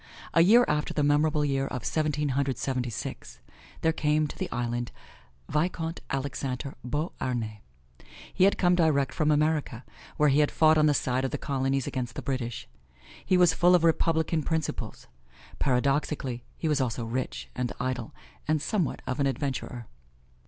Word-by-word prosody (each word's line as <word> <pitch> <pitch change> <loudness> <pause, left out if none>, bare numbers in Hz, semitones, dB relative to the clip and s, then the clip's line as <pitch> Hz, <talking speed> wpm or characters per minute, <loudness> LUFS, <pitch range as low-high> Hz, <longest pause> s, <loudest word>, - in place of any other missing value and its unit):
A 165 - +6
year 230 +8 +6
after 150 0 -1
the 150 - +2
memorable 150 +1 +2
year 135 -1 0
of 125 -3 -5
Seventeen 150 -2 0
Hundred 135 0 0
Seventy 125 -2 -2
six, 65 - -7 0.4
there 160 - +2
came 150 0 +1
to 150 - -6
the - - -4
island, 120 0 -2 0.6
Vicomte 165 +2 -1
Alexander 135 0 -3
Beauharnais. 125 - -3 0.7
He 185 - +4
had 200 - +3
come 180 -1 +3
direct 150 -6 +2
from 155 -1 +1
America, 150 -5 +1 0.3
where 150 0 +4
he 140 +2 +3
had 150 - +4
fought 155 0 +4
on 155 - +5
the 145 - +3
side 130 0 0
of 135 - 0
the - - -3
Colonies 135 -1 -1
against 125 -2 -4
the - - -5
British. 125 -4 -3 0.6
He 185 - +3
was 180 -2 +5
full 180 +1 +5
of 175 - +2
Republican 160 -1 +2
principles. 160 0 -3 0.5
Paradoxically, 135 -1 0
he 165 - -2
was 150 -2 +2
also 120 -2 -2
rich 125 +3 -4
and 125 -1 -2
idle 125 -3 -3 0.4
and 155 0 +2
somewhat 170 - -1
of 130 +2 -3
an 140 - +3
adventurer. 130 -3 -3
140 Hz, 165 wpm, -28 LUFS, 130-155 Hz, 0.7 s, A